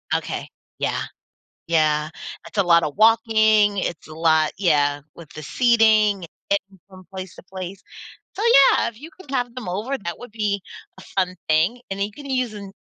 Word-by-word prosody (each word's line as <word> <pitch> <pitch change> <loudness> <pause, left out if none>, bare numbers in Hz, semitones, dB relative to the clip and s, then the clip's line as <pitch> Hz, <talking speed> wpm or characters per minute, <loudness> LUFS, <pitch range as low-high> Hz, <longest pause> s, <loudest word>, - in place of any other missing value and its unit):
Okay. - - -3 0.3
Yeah. - - -1 0.6
Yeah, 155 -2 +2 0.4
it's - - -12
a 200 - +4
lotta 170 -3 +4
walking, 220 0 +4
it's 170 -4 -3
a 155 - -11
lot 160 -1 +2
yeah, 145 -6 +2
with 165 -3 -13
the 155 - -7
seating, 215 - +3 0.3
eh 200 - +4 0.2
and 190 - -20
from 185 -1 -14
place 185 -2 -7
to - - -13
place. 190 0 -7 0.6
So, 415 - -3
yeah, 275 -13 +5
if 230 0 -11
you 310 - -9
can 290 - -13
have 245 -3 -2
them 255 -5 -7
over, 215 +10 -2
that 170 -6 -6
would 245 - -10
be 205 -2 -1 0.4
a - - -11
fun 185 -1 +1
thing. 165 +11 +2
And 195 - -4
you 205 +1 -3
can 285 +4 -11
use 255 -4 -1
an 200 -2 -9
200 Hz, 180 wpm, -22 LUFS, 170-225 Hz, 0.6 s, yeah